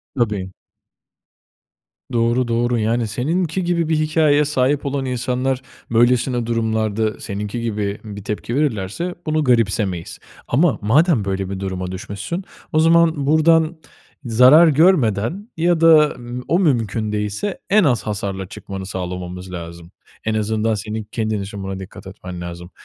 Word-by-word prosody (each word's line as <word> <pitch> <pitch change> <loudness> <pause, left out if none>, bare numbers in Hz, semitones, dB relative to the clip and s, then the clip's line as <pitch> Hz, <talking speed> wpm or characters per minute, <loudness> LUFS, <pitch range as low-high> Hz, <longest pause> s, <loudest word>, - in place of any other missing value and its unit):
Tabii. 105 -6 -1 1.6
Doğru, 120 +1 +2
doğru 120 +1 +1
yani 115 +2 0
seninki 160 - -1
gibi 170 -2 0
bir 160 - +2
hikâyeye 155 -1 +3
sahip 140 0 +1
olan 140 -1 -2
insanlar 125 +1 -1 0.3
böylesine 120 +1 +2
durumlarda 110 -2 -1
seninki 105 +3 -4
gibi 105 -3 -2
bir 105 -2 -8
tepki 105 +4 -4
verirlerse 145 - -1
bunu 155 -1 +1
garipsemeyiz. 105 -8 0 0.3
Ama 150 +4 +2
madem 130 - +3
böyle 95 -1 -2
bir 95 -1 -4
duruma 95 -1 -4
düşmüşsün 100 - -5 0.3
o 155 - +4
zaman 165 -2 +4
buradan 160 +2 +3 0.5
zarar 125 +8 +7
görmeden 155 - +2
ya 170 0 +2
da, 155 -2 +6
eee, 120 +1 -6
o 170 +5 +2
mümkün 115 - 0
değilse 105 - -3
en 210 +1 +5
az 125 -8 +2
hasarla 100 -2 -4
çıkmanı 95 0 -7
sağlamamız 90 0 -6
lazım. 85 0 -8 0.3
En 110 - -1
azından 110 +1 0
senin 110 +1 -4
kendin 110 -2 -1
için 100 0 -7
buna 95 0 -5
dikkat 95 0 -10
etmen 90 -2 -8
lazım. 85 +1 -8
115 Hz, 135 wpm, -20 LUFS, 100-150 Hz, 1.6 s, zarar